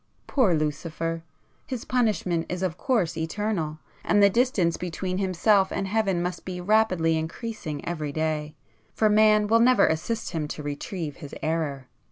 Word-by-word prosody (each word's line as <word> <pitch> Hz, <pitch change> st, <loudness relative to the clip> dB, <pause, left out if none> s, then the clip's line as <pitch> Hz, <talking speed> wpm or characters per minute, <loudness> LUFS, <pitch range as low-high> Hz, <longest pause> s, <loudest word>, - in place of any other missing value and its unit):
Poor 225 Hz, -, +3 dB
Lucifer! 165 Hz, +2 st, -2 dB, 0.5 s
His 255 Hz, -4 st, -5 dB
punishment 210 Hz, -9 st, 0 dB
is 180 Hz, +1 st, -3 dB
of 180 Hz, -4 st, -1 dB
course 220 Hz, -, 0 dB
eternal, 165 Hz, -1 st, -2 dB, 0.3 s
and 205 Hz, -, +2 dB
the 200 Hz, -, +6 dB
distance 205 Hz, -8 st, +2 dB
between 185 Hz, +1 st, -3 dB
himself 190 Hz, +1 st, +3 dB
and 195 Hz, -, -2 dB
Heaven 195 Hz, -4 st, +1 dB
must 180 Hz, 0 st, -4 dB
be 180 Hz, -1 st, -5 dB
rapidly 185 Hz, -4 st, +2 dB
increasing 160 Hz, -2 st, -5 dB
every 155 Hz, -4 st, -3 dB
day,—for 155 Hz, +7 st, -2 dB
Man 215 Hz, 0 st, +5 dB
will 225 Hz, +2 st, +4 dB
never 240 Hz, -3 st, +5 dB
assist 215 Hz, +8 st, -1 dB
him 155 Hz, -3 st, -2 dB
to 150 Hz, -, -6 dB
retrieve 145 Hz, +2 st, -5 dB
his 145 Hz, -5 st, -9 dB
error. 155 Hz, -4 st, -1 dB
180 Hz, 150 wpm, -26 LUFS, 160-215 Hz, 0.5 s, the